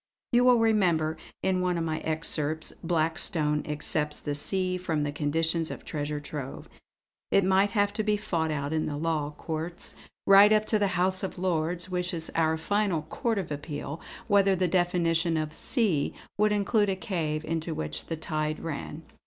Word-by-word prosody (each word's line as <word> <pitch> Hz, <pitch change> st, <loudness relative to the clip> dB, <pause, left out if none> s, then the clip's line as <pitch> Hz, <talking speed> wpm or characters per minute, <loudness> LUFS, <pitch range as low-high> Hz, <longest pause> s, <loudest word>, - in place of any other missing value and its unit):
You 245 Hz, 0 st, +4 dB
will 250 Hz, -1 st, +6 dB
remember, 180 Hz, -9 st, +2 dB, 0.3 s
in 185 Hz, -1 st, +1 dB
one 180 Hz, -1 st, +1 dB
of 165 Hz, -, -1 dB
my 160 Hz, -1 st, -2 dB
excerpts 155 Hz, -1 st, -1 dB
Blackstone 160 Hz, -2 st, +1 dB
excepts 150 Hz, 0 st, -2 dB
the 145 Hz, -, -3 dB
sea 185 Hz, +5 st, 0 dB
from 160 Hz, -4 st, -1 dB
the 145 Hz, -, -1 dB
conditions 160 Hz, +2 st, 0 dB
of -, -, -8 dB
treasure 150 Hz, -1 st, -3 dB
trove. 145 Hz, -2 st, -7 dB, 0.6 s
It 195 Hz, -, +4 dB
might 190 Hz, +2 st, +3 dB
have 205 Hz, 0 st, +2 dB
to 215 Hz, -, -1 dB
be 210 Hz, 0 st, +2 dB
fought 170 Hz, -6 st, -1 dB
out 145 Hz, 0 st, -2 dB
in 155 Hz, 0 st, 0 dB
the 145 Hz, -, -3 dB
Law 155 Hz, -2 st, -1 dB
Courts, 165 Hz, +2 st, -5 dB, 0.3 s
right 200 Hz, +2 st, +8 dB
up 215 Hz, 0 st, +4 dB
to 215 Hz, -, +2 dB
the 195 Hz, -3 st, 0 dB
House 185 Hz, +1 st, +2 dB
of 190 Hz, -, -4 dB
Lords 175 Hz, -1 st, -1 dB
which 180 Hz, -1 st, -1 dB
is 160 Hz, -1 st, -3 dB
our 160 Hz, -1 st, +2 dB
final 195 Hz, -1 st, 0 dB
Court 225 Hz, -, -2 dB
of 185 Hz, -6 st, -3 dB
Appeal, 145 Hz, +1 st, -5 dB, 0.2 s
whether 200 Hz, -1 st, +4 dB
the 185 Hz, 0 st, +1 dB
definition 170 Hz, -2 st, +2 dB
of 155 Hz, -1 st, -2 dB
'sea' 195 Hz, -, 0 dB, 0.2 s
would 210 Hz, +1 st, +3 dB
include 205 Hz, 0 st, +2 dB
a 190 Hz, -, +1 dB
cave 165 Hz, -4 st, -2 dB
into 165 Hz, 0 st, -2 dB
which 75 Hz, 0 st, -3 dB
the 165 Hz, -, -3 dB
tide 155 Hz, -1 st, -2 dB
ran." 160 Hz, 0 st, -5 dB
165 Hz, 180 wpm, -28 LUFS, 155-190 Hz, 0.6 s, right